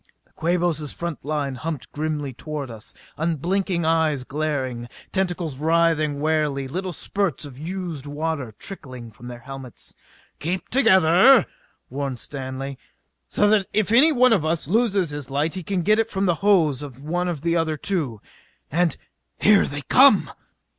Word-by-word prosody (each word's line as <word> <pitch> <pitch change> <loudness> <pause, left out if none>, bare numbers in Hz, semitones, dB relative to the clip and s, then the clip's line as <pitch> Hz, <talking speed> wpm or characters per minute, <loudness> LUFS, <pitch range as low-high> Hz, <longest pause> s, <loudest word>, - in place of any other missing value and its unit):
The - - -33
Quabos' 165 -3 0
front 170 -3 -5
line 145 -2 -2
humped 145 -2 -5
grimly 150 -2 -3
toward 145 0 -6
us, 110 -1 -9 0.2
unblinking 170 +3 -1
eyes 160 -4 +2
glaring, 130 -5 -3 0.2
tentacles 175 -7 -2
writhing 160 -1 +2
warily, 150 -3 0
little 185 +6 -4
spurts 195 0 -2
of 135 -2 -11
used 165 -3 -5
water 145 -4 -3
trickling 130 - -7
from 115 +3 -12
their 120 -1 -8
helmets. 135 -2 -10 0.5
"Keep 175 +5 -3
together," 220 0 +6 0.5
warned 135 -1 -3
Stanley, 135 -1 -6 0.5
"so 205 - +2
that 205 -3 +3
if 215 -1 +1
any 275 +8 +6
one 255 -3 +5
of 190 -8 +2
us 160 -2 -1
loses 200 -4 +1
his 145 -2 -6
light 145 +4 0
he 185 - -4
can 180 +1 -2
get 215 +4 +3
it 225 0 +1
from 195 -2 -1
the 175 - +3
hose 165 -9 +3
of 135 -2 -9
one 175 +4 -1
of 165 -5 -3
the 170 +1 +1
other 160 -2 0
two. 145 - -2 0.5
And 170 +2 +1 0.4
_Here 210 -1 +5
they 145 0 -5
come! 265 - +5
160 Hz, 155 wpm, -23 LUFS, 140-185 Hz, 0.5 s, together